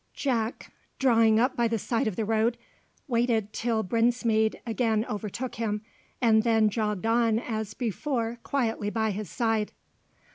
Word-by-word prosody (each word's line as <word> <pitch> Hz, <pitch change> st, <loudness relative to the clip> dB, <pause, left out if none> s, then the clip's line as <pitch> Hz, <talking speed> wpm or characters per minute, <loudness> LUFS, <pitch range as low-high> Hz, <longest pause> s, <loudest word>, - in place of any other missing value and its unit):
Jack, 235 Hz, -4 st, -2 dB, 0.2 s
drawing 230 Hz, -4 st, +4 dB
up 255 Hz, +3 st, +2 dB
by 235 Hz, -1 st, +2 dB
the 225 Hz, 0 st, 0 dB
side 225 Hz, +2 st, -1 dB
of 210 Hz, -, -2 dB
the 220 Hz, -, -1 dB
road, 225 Hz, +2 st, +1 dB, 0.5 s
waited 230 Hz, -4 st, +1 dB
till 225 Hz, -2 st, 0 dB
Brinsmead 230 Hz, 0 st, +1 dB
again 225 Hz, -2 st, 0 dB
overtook 215 Hz, +4 st, -4 dB
him, 210 Hz, -2 st, -2 dB, 0.4 s
and 225 Hz, -3 st, +4 dB
then 225 Hz, -2 st, +3 dB
jogged 210 Hz, -2 st, -1 dB
on 225 Hz, -1 st, +3 dB
as 220 Hz, -3 st, -4 dB
before 235 Hz, 0 st, -2 dB
quietly 225 Hz, -7 st, -1 dB
by 220 Hz, 0 st, 0 dB
his 205 Hz, -2 st, -5 dB
side. 225 Hz, 0 st, 0 dB
225 Hz, 145 wpm, -27 LUFS, 215-235 Hz, 0.5 s, drawing